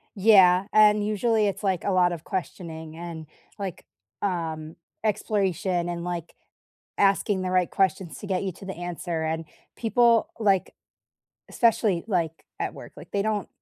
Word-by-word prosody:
Yeah, 190 Hz, -2 st, +6 dB
and 210 Hz, -1 st, +5 dB
usually, 215 Hz, 0 st, +2 dB
it's, 195 Hz, +1 st, -3 dB
like, 190 Hz, -3 st, 0 dB
a 200 Hz, -, 0 dB
lot 180 Hz, -1 st, +4 dB
of 165 Hz, -2 st, -6 dB
questioning 160 Hz, -4 st, -5 dB
and, 165 Hz, -2 st, -7 dB, 0.3 s
like, 195 Hz, -4 st, -6 dB, 0.4 s
um, 160 Hz, -4 st, -3 dB, 0.3 s
exploration 190 Hz, -4 st, 0 dB
and, 170 Hz, 0 st, -4 dB
like, 175 Hz, -2 st, -5 dB, 0.6 s
asking 195 Hz, -1 st, +2 dB
the 185 Hz, -, -2 dB
right 185 Hz, -1 st, +2 dB
questions 190 Hz, -3 st, 0 dB
to 205 Hz, -, -8 dB
get 190 Hz, -1 st, 0 dB
you 190 Hz, -, -2 dB
to 195 Hz, -, -12 dB
the 190 Hz, -, -5 dB
answer, 175 Hz, -1 st, -4 dB
and 160 Hz, 0 st, -2 dB, 0.3 s
people, 235 Hz, 0 st, +3 dB
like 195 Hz, -4 st, +2 dB, 0.8 s
especially, 215 Hz, -6 st, +2 dB
like, 165 Hz, -4 st, -1 dB, 0.2 s
at -, -, -2 dB
work, -, -, -11 dB
like, -, -, -11 dB
they 200 Hz, -, 0 dB
don't 210 Hz, -2 st, -1 dB
185 Hz, 155 wpm, -26 LUFS, 170-205 Hz, 0.8 s, Yeah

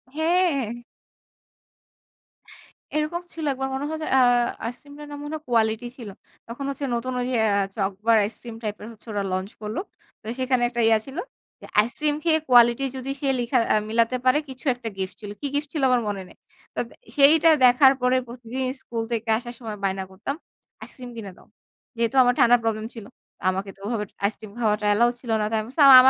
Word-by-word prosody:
হ্যাঁ। 315 Hz, -, +2 dB, 2.2 s
এরকম 305 Hz, +3 st, -1 dB
ছিল 320 Hz, -2 st, -5 dB
একবার 265 Hz, 0 st, -3 dB
মনে 280 Hz, +2 st, -3 dB
হয়। 315 Hz, 0 st, -4 dB
যে -, -, -3 dB
আ -, -, +6 dB, 0.4 s
আইসক্রিমটা 285 Hz, +5 st, -8 dB
নাম 290 Hz, -, -7 dB
মনে 295 Hz, +1 st, -6 dB
হয় 310 Hz, -, -8 dB
কোয়ালিটি 225 Hz, 0 st, +1 dB
ছিল। 225 Hz, -5 st, -8 dB, 0.4 s
তখন 240 Hz, +4 st, -6 dB
হচ্ছে 280 Hz, 0 st, -3 dB
নতুন 255 Hz, +2 st, -3 dB
ওইযে 250 Hz, 0 st, -1 dB, 0.2 s
আ -, -, +3 dB, 0.2 s
চকবার 200 Hz, +3 st, +1 dB
আইসক্রিম 230 Hz, +1 st, -8 dB
টাইপের 210 Hz, 0 st, -4 dB
হচ্ছে 225 Hz, +1 st, -18 dB
ওরা 205 Hz, -1 st, -1 dB
launch 185 Hz, +2 st, -3 dB
করলো। 215 Hz, +6 st, -3 dB, 0.4 s
তো -, -, -26 dB
সেখানে 255 Hz, -1 st, +1 dB
একটা 240 Hz, -1 st, -2 dB
ইয়া 225 Hz, -1 st, +5 dB
ছিল। 270 Hz, +4 st, -9 dB, 0.4 s
যে -, -, -10 dB
আইসিইক্রিম 290 Hz, +7 st, +1 dB
খেয়ে 320 Hz, -2 st, +3 dB
কোয়ালিটি 240 Hz, +2 st, +6 dB
যদি 260 Hz, +1 st, -4 dB
সে 275 Hz, -, 0 dB
লিখা 245 Hz, +2 st, +1 dB, 0.2 s
আ -, -, +4 dB
মিলাতে 230 Hz, +2 st, +2 dB
পারে 255 Hz, +3 st, +5 dB
কিছু 265 Hz, +3 st, -10 dB
একটা 235 Hz, -2 st, -6 dB
গিফট 190 Hz, 0 st, -4 dB
ছিল। 205 Hz, -1 st, -7 dB
কী 285 Hz, -, -1 dB
গিফট 290 Hz, 0 st, -1 dB
ছিল? 295 Hz, -4 st, -1 dB
আমার 250 Hz, -1 st, +3 dB
মনে 200 Hz, -2 st, -2 dB
নেই। -, -, -17 dB, 0.4 s
তো -, -, -2 dB, 0.4 s
সেইটা 315 Hz, +3 st, +7 dB, 0.2 s
দেখার 265 Hz, +2 st, +7 dB
পরে 250 Hz, +1 st, +3 dB
প্রতিদিন 245 Hz, +2 st, -6 dB, 0.2 s
স্কুল 230 Hz, -1 st, -4 dB
থেকে 225 Hz, -1 st, -2 dB
আসার 240 Hz, 0 st, -7 dB
সময় 220 Hz, -3 st, -6 dB
বায়না 190 Hz, 0 st, 0 dB
করতাম। 215 Hz, +9 st, -4 dB, 0.5 s
"আইসিইক্রিম 250 Hz, -1 st, -9 dB
কিনে 200 Hz, -4 st, -6 dB
দাও।" -, -, -18 dB, 0.5 s
যেহেতু 235 Hz, +3 st, 0 dB
আমার 245 Hz, 0 st, +4 dB
ঠান্ডার 240 Hz, 0 st, +6 dB
প্রবলেম 220 Hz, -1 st, -1 dB
ছিল, 225 Hz, -4 st, -9 dB, 0.4 s
আমাকে 190 Hz, +1 st, -2 dB
তো -, -, -26 dB
ওভাবে 215 Hz, -3 st, -1 dB, 0.2 s
আইসক্রিম 210 Hz, 0 st, -3 dB
খাওয়াটা 210 Hz, -2 st, +1 dB
অ্যালাউ 235 Hz, +4 st, +4 dB
ছিল 235 Hz, -3 st, -5 dB
না। -, -, +1 dB
তো -, -, -6 dB
আমি 215 Hz, -, -4 dB
বলছি, 290 Hz, +3 st, -1 dB
"আমা 265 Hz, -, +11 dB
240 Hz, 190 wpm, -24 LUFS, 220-270 Hz, 2.2 s, আমা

